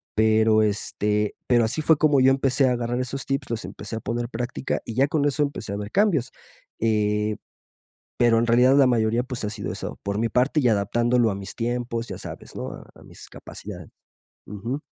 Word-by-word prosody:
Pero, 110 0 +4
este, 105 0 0
pero 120 -2 +4
así 115 +8 -1
fue 155 -1 +4
como 145 -3 +4
yo 130 +1 +6
empecé 135 0 +2
a 125 - +2
agarrar 120 +1 -2
esos 130 +1 -3
tips, 135 -2 -2
los 115 -5 -3
empecé 105 +3 -7
a - - -3
poner 120 +1 -3
práctica 120 +2 -3
y 115 - -5
ya 135 +4 +3
con 145 -1 0
eso 145 +1 +1
empecé 140 -8 -2
a - - -3
ver 105 0 -5
cambios, 170 - +2 0.5
eh, 105 -1 +1 0.8
pero 120 -1 +4
en 120 - 0
realidad 125 +4 +5
la 135 -2 +6
mayoría, 115 0 +2
pues, 125 -4 -6
ha 105 - -1
sido 105 -3 -5
eso, - - -6
por 100 0 -3
mi 115 +1 0
parte 130 +6 +2
y 125 - +3
adaptándolo 115 +3 +2
a - - -3
mis 100 0 -8
tiempos, 120 0 -2
ya - - -6
sabes, - - -10
¿no? - - -5
A - - -12
a - - -16
mis - - -13
capacidades. - - -10 0.6
Ujú. 115 +8 -5
120 Hz, 205 wpm, -24 LUFS, 110-130 Hz, 0.8 s, yo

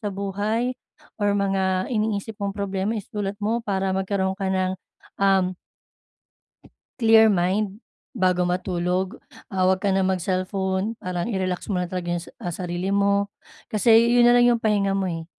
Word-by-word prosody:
sa 210 - -3
buhay 205 +5 -1 0.5
or 205 0 +2
mga 190 -2 0
iniisip 215 -1 -1
mong 200 0 -1
problema 200 +2 -2
isulat 205 0 -4
mo 220 +3 0
para 195 -3 -1
magkaroon 190 0 -1
ka 195 -2 -1
ng, 185 0 0 0.5
um 190 -2 +3 1.5
Clear 220 -1 +6
mind 195 +3 0 0.3
bago 185 -4 +1
matulog. 180 +2 -1 0.3
Ah, 185 -1 0
huwag 185 0 +3
ka 200 - 0
na 195 0 +2
mag-cellphone. 190 +2 -1
Parang 180 -1 -3
i-relax 185 -2 -2
mo 180 - 0
lang 180 - -2
talaga 175 -1 -3
yung 175 - -1
sa, 170 - -11
ah, 175 - -5
sarili 180 +2 -3
mo. 200 0 +2 0.4
Kasi 220 +2 +3 0.2
'yon 240 0 +6
na 240 - +6
lang 245 - +5
'yong 235 - 0
pahinga 205 -3 +1
mo, 195 -1 0
eh, 165 -2 -4
195 Hz, 160 wpm, -24 LUFS, 185-205 Hz, 1.5 s, Clear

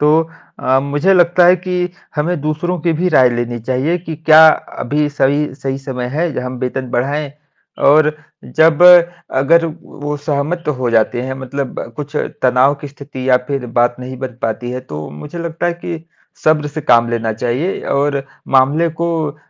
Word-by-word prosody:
तो 150 +2 +4 0.4
अ, 130 +1 +2
मुझे 145 +7 +1
लगता 175 0 +4
है 180 +1 +6
कि 180 0 -2 0.3
हमें 160 +2 -1
दूसरों 155 +4 -2
की 170 +1 +1
भी 180 +2 +1
राय 130 -3 +6
लेनी 120 0 -3
चाहिए 130 +8 -1
कि 165 -2 -7
क्या 160 0 +7 0.4
अभी 150 +3 0
सही 145 0 0
सही 135 -1 -4
समय 130 -2 -5
है, 170 +3 0
हम 125 0 -5
वेतन 130 0 -3
बढ़ाएँ 140 +4 -2 0.6
और 150 +1 +5 0.4
जब 160 +1 +4 0.6
अगर 165 +5 +4 0.2
वो 145 +1 -6
सहमत 145 +4 -2
हो 125 -2 -1
जाते 115 +1 +1
हैं, 130 +1 -4
मतलब 135 +1 -5 0.2
कुछ 150 0 -6 0.3
तनाव 130 +2 +4
की 145 - -5
स्थिति 140 -2 -8
या 125 - +6
फ़िर 135 -3 -2
बात 120 0 +2
नहीं 130 +1 -7
बन 125 -2 -6
पाती 115 +2 -2
है, 125 +1 -4
तो 75 -12 -8
मुझे 145 - -9
लगता 170 0 -3
है 175 - +1
कि 165 -2 -5 0.4
सब्र 155 -1 +3
से 150 +2 -5
काम 120 -4 +3
लेना 115 -1 -1
चाहिए 125 - -2 0.2
और 140 -1 0 0.3
मामले 145 +6 +3
को 170 - +1 0.2
अ, 145 - -17
145 Hz, 175 wpm, -16 LUFS, 130-160 Hz, 0.6 s, क्या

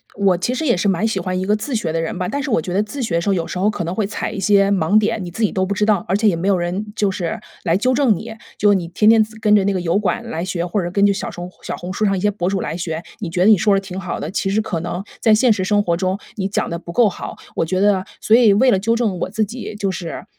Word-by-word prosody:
我 195 -3 +2
其 210 +8 -1
实 315 +5 -2
也 245 - +3
是 200 - 0
蛮 195 +4 +1
喜 195 -4 -1
欢 185 +1 -2
一 185 - -2
个 210 +1 +2
自 240 +6 -5
学 175 -8 -1
的 165 - -1
人 165 +2 -4
吧， 180 - -2
但 285 +6 -2
是 270 - -3
我 165 - +2
觉 180 +2 -5
得 205 +2 +2
自 260 +6 -6
学 170 -8 0
时 200 - -2
候 - - +3
有 170 -3 -1
时 180 - -5
候 200 +3 +2
可 190 -5 -3
能 170 +3 -3
会 215 - 0
踩 210 +1 -4
一 210 - -5
些 195 0 +3
盲 195 +2 +3
点， 210 -2 -1
你 175 - -7
自 225 - -3
己 210 - +2
都 185 - 0
不 200 - -2
知 210 +2 +1
道， 210 -4 +2
而 190 - +1
且 215 +2 +2
也 190 - +3
没 175 +4 -2
有 195 -2 +3
人 175 +4 -2
就 205 -2 +1
是 185 +4 -3 0.2
来 165 -2 +2
纠 255 +5 +1
正 250 -5 +3
你。 220 +4 -7 0.2
就 205 0 +4
你 175 -3 -1
天 210 +5 +3
天 225 -1 +6
自 220 0 -11
跟 210 -1 +4
着 200 - +4
那 200 0 +1
个 185 - -1
油 175 +3 +1
管 215 +4 -2
来 165 +2 -3
学， 175 -2 -2
或 180 +4 -1
者 175 - -2
是 175 - -4
根 200 +1 +3
据 200 - +4
小 195 - -4
什 175 - -8 0.2
小 - - -4
红 180 +1 -6
书 215 - 0
上 195 -1 +1
一 - - -3
些 210 - +3
博 185 -3 -2
主 195 -2 -1
来 - - -3
学， 165 -2 -3 0.2
你 190 -6 -4
觉 180 +2 0
得 215 - +6
你 210 - +7
说 205 +3 +3
着 195 - +3
挺 190 -1 -7
好 180 -2 -4
的， 155 - -4
其 195 +1 -1
实 215 +3 +1
可 180 -6 -3
能 175 +2 -4 0.2
在 220 -2 +5
现 240 +3 +4
实 195 -3 -2
生 205 +2 +2
活 170 -2 +1
中， 190 +2 -1 0.2
你 195 -2 -2
讲 195 - -2
得 170 - -3
不 170 0 -9
够 225 +1 +4
好。 - - -8 0.2
我 - - 0
觉 185 +3 -1
得 195 -2 +2 0.2
所 220 - +4
以 230 -4 +6
为 255 +6 +4
了 195 - +3
纠 230 +3 +1
正 215 -7 -1
我 - - -2
自 220 -1 0
己 220 0 -7
就 200 -2 -1
是， 175 -3 -6
195 Hz, 360 characters per minute, -19 LUFS, 180-215 Hz, 0.2 s, 你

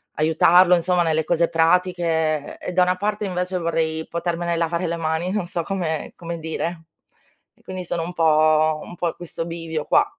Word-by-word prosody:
aiutarlo 170 +3 +5
insomma, 175 0 +2
nelle 160 -1 +1
cose 170 0 +2
pratiche 165 -3 +1
e - - -5
da 180 - +4
una 180 0 +1
parte 210 +2 -2
invece 180 0 -2
vorrei 160 -1 -1
potermene 170 0 -2
lavare 170 +1 -1
le 170 - -1
mani, 165 +2 -1
non 205 -4 -2
so 170 -1 -3
come 165 -5 -3
come 170 -1 -6
dire. 160 +1 -4 0.7
E - - -28
quindi 185 -1 -6
sono 170 -1 -2
un 175 - -6
po' 155 -1 +3
un 175 - -10
po' 175 - -1
a - - -3
questo 165 -1 -6
bivio 165 -2 -4
qua. - - +4
170 Hz, 185 wpm, -22 LUFS, 160-180 Hz, 0.7 s, aiutarlo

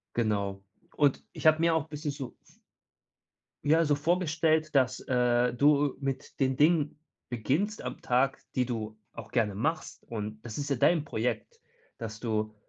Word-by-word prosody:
Genau. 100 -4 0 0.3
Und 145 -3 +3
ich - - -4
habe 155 0 +6
mir 165 0 +3
auch 160 -1 -1
bisschen 150 -1 -4
so 140 -3 -7
v - - -23 1.1
ja 160 +3 +4
so 145 - +3
vorgestellt, 155 0 +1
dass, 130 -2 +3
äh, 125 -1 +2
du 145 +1 +3
mit 135 -1 -4
den 130 -1 +1
Dingen 155 -1 +3 0.3
beginnst 150 - -1
am - - -6
Tag, 130 +2 +2 0.2
die 125 -1 +1
du 110 -3 -4 0.2
auch 115 -1 -9
gerne 110 -5 +1
machst. 155 +11 -2
Und 110 -1 -5
das 115 +1 -6
ist 145 -1 -3
ja 140 - +1
dein 155 +4 +3
Projekt, 140 - -3 0.3
dass 110 -2 -7
du, 110 -2 -1
135 Hz, 160 wpm, -29 LUFS, 115-155 Hz, 1.1 s, habe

